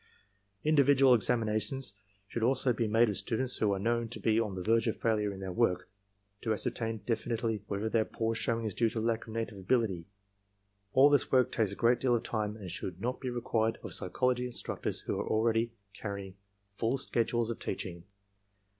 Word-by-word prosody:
Individual 140 -3 +5
examinations 115 +1 0 0.3
should 115 - -4
also 125 +1 +2
be 115 -1 0
made 115 +3 +4
of 105 - -1
students 125 +6 -1
who 105 -2 +2
are 100 - +1
known 115 +3 0
to 120 - -6
be 110 0 +2
on 105 -4 -1
the 90 - -4
verge 115 +3 +3
of 110 - 0
failure 105 -3 +1
in 95 - -8
their 95 -1 -4
work, 105 -3 +1 0.5
to 110 - -1
ascertain 115 0 -1
definitely 115 -1 -1
* - - -35
whether 100 +2 -2
their 110 0 +2
poor 115 +1 -2
showing 115 0 -1
is 110 - -2
due 115 -2 +2
to 110 - -3
lack 115 0 -1
of 110 - -8
native 115 -3 -3
ability. 95 -5 0 0.9
All 140 +2 +7
this 145 -3 +3
work 130 -2 +4
takes 110 -4 +1
a - - -5
great 120 +2 +3
deal 125 -2 +3
of 115 - -1
time 105 -1 -2
and 95 -5 -7
should 90 0 -5
not 125 +5 -2
be 130 - -3
required 115 -2 0
of - - -5
psychology 125 +6 0
instnictors 120 - -4
who - - -2
already 115 +1 +2
are 100 -3 -27
carrying 100 -2 -5 0.4
full 120 +4 +1
schedules 120 -2 0
of 115 - -6
teaching. 85 -2 -5
115 Hz, 195 wpm, -31 LUFS, 105-120 Hz, 0.9 s, All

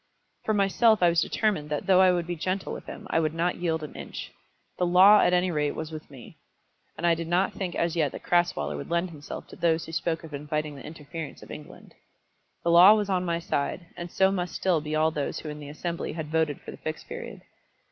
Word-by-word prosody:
For 215 - +1
myself 205 +1 +3
I 175 - +7
was 170 -1 +2
determined 190 -6 0
that 150 -1 -2
though 190 -1 +5
I 185 -1 +6
would 175 -2 0
be 175 +1 -3
gentle 185 +4 -3
with - - -8
him - - -8
I - - +3
would 155 -1 -1
not 170 +2 0
yield 160 -2 -1
an 150 - -7
inch. - - -7 0.5
The 180 - +2
law 190 +4 +7
at - - +4
any 180 0 +2
rate 150 -2 0
was 160 0 -5
with 155 -1 -8
me, 135 -4 -13 0.6
and 175 - -3
I 170 - +5
did 165 0 -4
not 180 +3 +1
think 185 -3 -4
as 170 0 0
yet 155 -5 +1
that - - -8
Crasweller 175 - +1
would 70 - -7
lend 170 +1 0
himself 145 -2 -8
to - - -11
those 165 -1 +1
who 160 - -9
spoke 165 0 -2
of 160 -2 -10
inviting 150 +1 -3
the 135 - -10
interference 155 0 -8
of - - -12
England. 150 - -11 0.7
The 170 - +2
law 180 +5 +9
was 205 -2 -1
on 180 -1 +1
my 170 -2 0
side, 170 +1 -2
and 175 0 -6
so 190 0 +3
must 180 -3 -3
still 180 -5 +1
be 155 +1 -3
all 155 +1 +3
those 145 -3 -3
who 155 - -6
in 150 0 -7
the 145 -1 -9
Assembly 170 +3 -4
had 155 -2 -5
voted 160 -3 0
for - - -9
the - - -10
Fixed 155 0 -6
Period. 475 +1 -8
170 Hz, 240 wpm, -27 LUFS, 155-180 Hz, 0.7 s, law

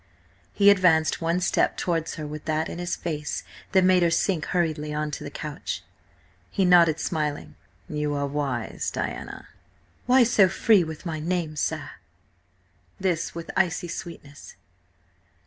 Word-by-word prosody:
He 200 0 +6
advanced 175 -4 +3
one 165 +2 +1
step - - +1
towards 165 -2 -1
her 155 - -5
with 150 0 -7
that 155 0 -1
in 170 - -6
his 175 0 -2
face 150 -3 -4 0.3
that 190 -1 +4
made 185 0 +5
her 170 - +4
sink 165 -1 +1
hurriedly 155 -4 -1
on 150 0 -2
to - - -5
the - - -6
couch. - - -5 0.7
He 195 - +1
nodded 170 -3 +5
smiling. 150 -3 -2 0.3
"You 150 -1 -2
are 140 0 -1
wise, 140 -5 -2
Diana." - - -5 0.6
"Why 255 0 +6
so 210 -5 +4
free 200 0 +4
with 160 +2 -8
my 160 -2 -3
name, 165 -1 -2
sir?" 150 - -2 1.1
This 180 -5 -1
with 170 -1 -6
icy 175 -2 +1
sweetness. 145 -4 -9
165 Hz, 145 wpm, -25 LUFS, 150-180 Hz, 1.1 s, He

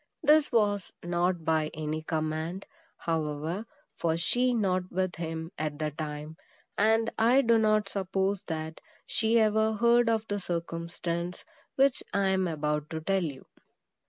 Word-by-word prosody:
This 300 0 +5
was 205 -5 +1
not 175 -1 0
by 155 -1 +2
any 155 0 -3
command, 160 +3 -3 0.3
however, 160 +5 -2 0.3
for 165 -1 +1
she 245 +9 +2
was 240 - +1
not 185 -3 0
with 185 -1 -1
him 165 0 -4
at 155 -1 -2
the 155 0 -2
time, 150 +1 -6 0.4
and 225 +2 +3
I 240 +5 +5
do 230 -2 +4
not 215 -1 +3
suppose 195 0 -1
that 160 -1 -4 0.2
she 225 +1 +2
ever 220 0 +3
heard 235 +1 +4
of 225 -1 0
the 205 0 -2
circumstance 170 0 -4 0.3
which 270 -1 +3
I 200 -1 +3
am 190 -1 +2
about 150 -2 -2
to 160 - -3
tell 195 +3 +1
you. 140 -5 -5
180 Hz, 150 wpm, -29 LUFS, 160-215 Hz, 0.4 s, This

